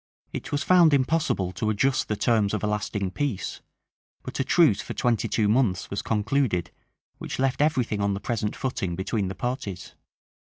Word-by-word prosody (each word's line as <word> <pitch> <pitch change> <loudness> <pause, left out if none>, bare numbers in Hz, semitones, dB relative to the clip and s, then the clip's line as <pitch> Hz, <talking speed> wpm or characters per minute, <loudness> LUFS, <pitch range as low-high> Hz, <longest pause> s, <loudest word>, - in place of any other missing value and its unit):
It - - -5
was 145 +1 0
found 175 -5 +6
impossible 130 - +1
to 110 +3 -2
adjust 130 +5 +1
the 105 - -1
terms 110 -2 +2
of 110 - -4
a - - +2
lasting 105 -2 -2
peace; 125 -6 -3 0.6
but - - -6
a - - +3
truce - - +4
for - - -7
twenty 120 -4 +1
two 110 -2 +1
months 105 -5 +1
was 100 - -2
concluded, 110 -5 0 0.5
which - - -5
left 135 +1 +1
every 150 -4 +3
thing 105 -3 -3
on 100 0 +1
the - - -4
present 105 0 -2
footing 95 -9 -2
between 95 +2 -1
the 95 - -5
parties. 105 -8 -4
110 Hz, 185 wpm, -26 LUFS, 100-130 Hz, 0.6 s, found